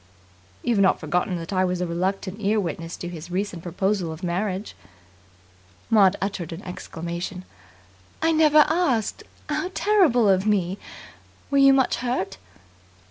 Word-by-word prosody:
"You've 235 -4 +1
not 195 -1 +4
forgotten 175 +3 -1
that 165 +3 -6
I 185 0 +2
was 180 -1 -1
a 180 - 0
reluctant 185 +3 -2
ear 210 +1 +1
witness 165 -2 -4
to 175 - -6
his 170 -1 -8
recent 185 -1 -3
proposal 180 0 -1
of 160 +3 -9
marriage?" 185 +3 -2 1.2
Maud 200 -3 +5
uttered 190 -4 -3
an 165 +4 -7
exclamation. 175 +1 -6 0.7
"I 325 +1 +2
never 305 -1 +6
asked! 295 - 0 0.3
How 365 - -2
terrible 345 - +4
of 190 +1 +3
me. 195 -2 +1 0.7
Were 280 - +3
you 275 0 +7
much 265 -2 +2
hurt?" 240 - -2
190 Hz, 140 wpm, -24 LUFS, 175-225 Hz, 1.2 s, you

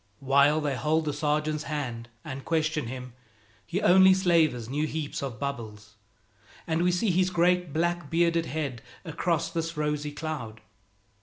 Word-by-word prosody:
While 140 +3 +4
they 145 -2 -1
hold 155 +6 +1
the 150 - -1
sergeant's 150 +1 -1
hand 125 -6 -4 0.2
and 130 0 -6
question 155 -4 0
him, 125 0 -7 0.5
he 190 +4 -2
only 190 +1 +7
slavers 165 - +2
new 150 +5 -1
heaps 155 -1 -4
of 130 -6 -5
bubbles, 110 -6 -6 0.7
and 160 0 0
we 180 +1 +3
see 180 +3 +1
his 185 +1 +2
great 180 -1 +2
black 170 0 -1
bearded 170 0 +2
head 140 -6 -3 0.2
across 165 0 -1
this 165 -1 -3
rosy 150 -1 -1
cloud. 145 -9 -6
155 Hz, 150 wpm, -27 LUFS, 140-170 Hz, 0.7 s, only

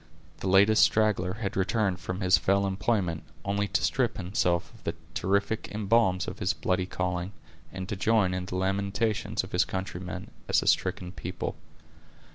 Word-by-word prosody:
The - - -3
latest 100 +3 +6
straggler 105 -4 +2
had 100 -2 -4
returned 95 -1 +1
from 90 +2 -4
his 95 -1 +5
fell 100 +1 +2
employment, 95 -4 0 0.2
only 100 +1 0
to - - 0
strip 130 -5 +1
himself 90 -2 0
of - - -18
the - - -2 0.2
terrific 100 +3 0
emblems 100 -3 +2
of 95 +4 -6
his 95 -3 +1
bloody 90 0 -1
calling, 90 +1 -2 0.4
and 95 0 -6
to 105 - -3
join 100 -1 +2
in 90 0 -2
the 90 - -4
lamentations 100 +3 0
of - - -9
his - - +3
countrymen, 95 -1 -5 0.2
as - - +3
a - - -6
stricken 90 -1 +1
people. 90 -1 -5
95 Hz, 165 wpm, -28 LUFS, 90-105 Hz, 0.4 s, latest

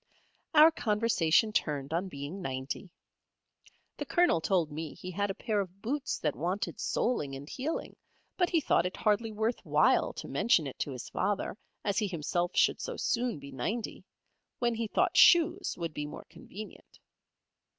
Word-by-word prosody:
Our 310 +2 +9
conversation 215 - +2
turned 145 -4 -1
on 175 +4 0
being 145 +4 -6
ninety. 130 +4 -4 1.1
The - - -4
Colonel 345 - +3
told 170 -3 +1
me 155 0 -5
he 185 - -7
had 200 +3 -1
a 195 - -3
pair 215 -3 -1
of 190 -1 -5
boots 280 +4 -2
that 150 -3 -1
wanted 180 +6 -2
soleing 150 - -1
and 140 +2 -9
heeling 280 - -4 0.4
but 355 -2 +2
he 335 - +3
thought 180 - +2
it 185 - -7
hardly 220 +1 +1
worth 220 +3 -1
while - - +3
to - - -7
mention 205 -10 +2
it 135 - -7
to 145 - -2
his 125 -2 -7
father, 205 -2 -1 0.3
as 200 +1 +1
he 210 - 0
himself 175 0 -1
should - - +3
so - - -4
soon 240 -5 0
be 140 0 -10
ninety, 210 - -4 0.5
when 240 -1 +1
he 230 0 -2
thought - - +1
shoes 345 +2 +5
would 165 -3 -4
be 150 0 -4
more - - -9
convenient. 210 +3 -11
195 Hz, 170 wpm, -30 LUFS, 155-230 Hz, 1.1 s, Our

